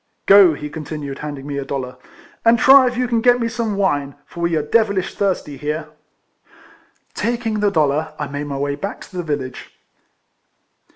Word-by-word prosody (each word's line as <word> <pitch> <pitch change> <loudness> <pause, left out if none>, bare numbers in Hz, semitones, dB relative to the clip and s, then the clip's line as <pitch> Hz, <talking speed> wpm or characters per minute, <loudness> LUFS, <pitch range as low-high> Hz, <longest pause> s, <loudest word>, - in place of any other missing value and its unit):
" - - -49
Go," 195 -5 +7
he 150 - -6
continued, 150 -2 -6
handing 145 -2 -6
me 140 -1 -4
a - - -3
dollar, 130 -2 -5 0.3
" - - -26
and 230 +1 +5
try 265 +2 +7
if 245 0 -2
you 250 0 0
can 235 -1 0
get 245 0 +3
some 230 -3 -2
wine; 145 -8 0
for - - -12
we 170 -1 0
are 155 - 0
devilish 200 +2 +1
thirsty 185 -8 -2
here." 150 +2 -4 1.2
Taking 230 -2 -2
the 205 0 +2
dollar, 155 -2 0
I 150 - -3
made 145 +1 -5
my 140 -1 -4
way 140 +1 -1
back 195 +9 -6
to - - -13
the - - -1
village. 145 -6 -5
160 Hz, 185 wpm, -19 LUFS, 145-215 Hz, 1.2 s, Go